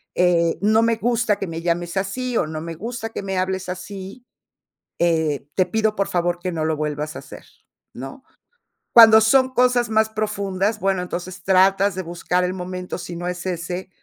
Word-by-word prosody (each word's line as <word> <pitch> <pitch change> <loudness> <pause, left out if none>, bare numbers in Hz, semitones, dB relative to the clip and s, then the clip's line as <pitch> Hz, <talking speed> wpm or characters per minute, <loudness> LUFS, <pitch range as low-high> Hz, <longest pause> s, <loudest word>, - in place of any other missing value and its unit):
Eh, 170 -2 +2
no 215 +2 +4
me 230 0 +2
gusta 235 -2 +1
que 195 - -3
me 165 0 -5
llames 175 +1 -2
así, 240 +6 -2
o - - +1
no 155 0 -5
me 165 0 -6
gusta 225 +5 -5
que 225 - -6
me 195 -1 -3
hables 185 0 -2
así, 195 +5 -8 0.7
eh, 160 -4 0
te 185 - +2
pido, 220 -1 0
por 200 - 0
favor, 175 0 0
que 180 0 -3
no 160 -2 -2
lo 160 0 0
vuelvas 150 0 -3
a - - -5
hacer", - - -12 0.5
¿no? 135 - -9 0.7
Cuando 225 -2 +9
son 260 +3 +3
cosas 245 -2 +2
más 220 0 +2
profundas, 205 -1 -2
bueno, 190 0 0
entonces 180 +1 -6
tratas 195 +1 +3
de 185 - -3
buscar 175 +1 -1
el 180 0 -1
momento 180 0 -5
si 175 0 -7
no 175 +1 -4
es 180 0 -5
ese, 180 +1 -4
185 Hz, 190 wpm, -21 LUFS, 175-215 Hz, 0.7 s, Cuando